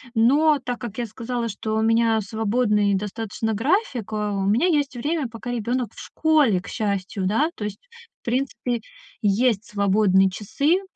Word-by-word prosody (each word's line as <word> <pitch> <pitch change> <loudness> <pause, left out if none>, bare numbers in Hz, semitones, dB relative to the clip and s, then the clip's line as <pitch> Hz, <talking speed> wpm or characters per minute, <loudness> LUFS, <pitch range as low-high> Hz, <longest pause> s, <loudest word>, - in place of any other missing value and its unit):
Но 285 +6 +4
так 245 -1 -3
как 235 -4 -7
я 240 - -1
сказала, 230 +2 -3
что 215 +2 -3
у - - +1
меня 225 0 +3
свободный 210 -1 +1
достаточно 220 +2 -3
график, 255 - 0
э, 210 -1 -1
у 195 -1 -1
меня 225 - +3
есть 290 -6 +1
время, 290 +3 -1
пока 235 +2 -7
ребёнок 245 0 -1
в - - -13
школе, 295 - +2
к - - -13
счастью, 200 -2 -2
да, 285 - +2
то 210 - -5
есть, 210 - -5 0.4
в - - -58
принципе, 240 -1 -1 0.4
есть 215 +1 +2
свободные 200 -2 +3
часы. 280 - 0
225 Hz, 165 wpm, -23 LUFS, 210-250 Hz, 0.4 s, Но